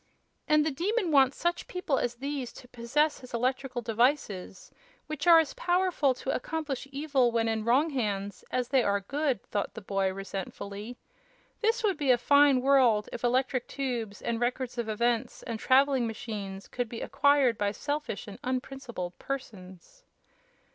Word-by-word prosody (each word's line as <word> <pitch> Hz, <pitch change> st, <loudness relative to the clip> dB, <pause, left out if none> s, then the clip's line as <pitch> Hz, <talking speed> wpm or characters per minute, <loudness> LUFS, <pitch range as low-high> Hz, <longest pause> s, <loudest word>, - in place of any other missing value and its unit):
"And 305 Hz, 0 st, +4 dB
the 315 Hz, -, +1 dB
Demon 370 Hz, -, 0 dB
wants 270 Hz, -2 st, +4 dB
such 345 Hz, +1 st, -1 dB
people 360 Hz, -7 st, -1 dB
as 240 Hz, 0 st, -1 dB
these 275 Hz, 0 st, -4 dB
to 250 Hz, -, -13 dB
possess 255 Hz, +6 st, 0 dB
his 255 Hz, -2 st, -8 dB
electrical 255 Hz, 0 st, -1 dB
devices, 225 Hz, -5 st, 0 dB, 0.3 s
which 305 Hz, 0 st, -4 dB
are 335 Hz, -1 st, +9 dB
as 320 Hz, -3 st, +2 dB
powerful 350 Hz, -7 st, +1 dB
to 265 Hz, -, -3 dB
accomplish 290 Hz, -1 st, -3 dB
evil 275 Hz, -4 st, +1 dB
when 230 Hz, -1 st, +1 dB
in 220 Hz, -1 st, -1 dB
wrong 275 Hz, +7 st, +3 dB
hands 205 Hz, -6 st, -2 dB
as 250 Hz, -1 st, -1 dB
they 265 Hz, -2 st, +4 dB
are 200 Hz, -3 st, +1 dB
good!" 275 Hz, +1 st, -1 dB
thought 205 Hz, -, -3 dB
the -, -, -5 dB
boy, 195 Hz, -1 st, 0 dB
resentfully. 200 Hz, +3 st, -6 dB, 0.6 s
"This 460 Hz, +1 st, +1 dB
would 395 Hz, -6 st, +1 dB
be 285 Hz, -3 st, -1 dB
a 250 Hz, -, +6 dB
fine 285 Hz, +1 st, +5 dB
world 255 Hz, -6 st, +4 dB
if -, -, -6 dB
Electric 255 Hz, 0 st, +1 dB
Tubes 240 Hz, -7 st, -4 dB
and 230 Hz, -1 st, -1 dB
Records 245 Hz, 0 st, -2 dB
of 230 Hz, -2 st, -2 dB
Events 235 Hz, +2 st, -1 dB
and 230 Hz, -3 st, -4 dB
Traveling 265 Hz, -1 st, +3 dB
Machines 205 Hz, -3 st, -6 dB
could 245 Hz, -2 st, -3 dB
be 230 Hz, -, -6 dB
acquired 285 Hz, -4 st, +3 dB
by 205 Hz, -1 st, +1 dB
selfish 290 Hz, -1 st, -4 dB
and 200 Hz, -, -9 dB
unprincipled 250 Hz, -7 st, -4 dB
persons!" 220 Hz, -, -8 dB
255 Hz, 160 wpm, -29 LUFS, 225-285 Hz, 0.6 s, are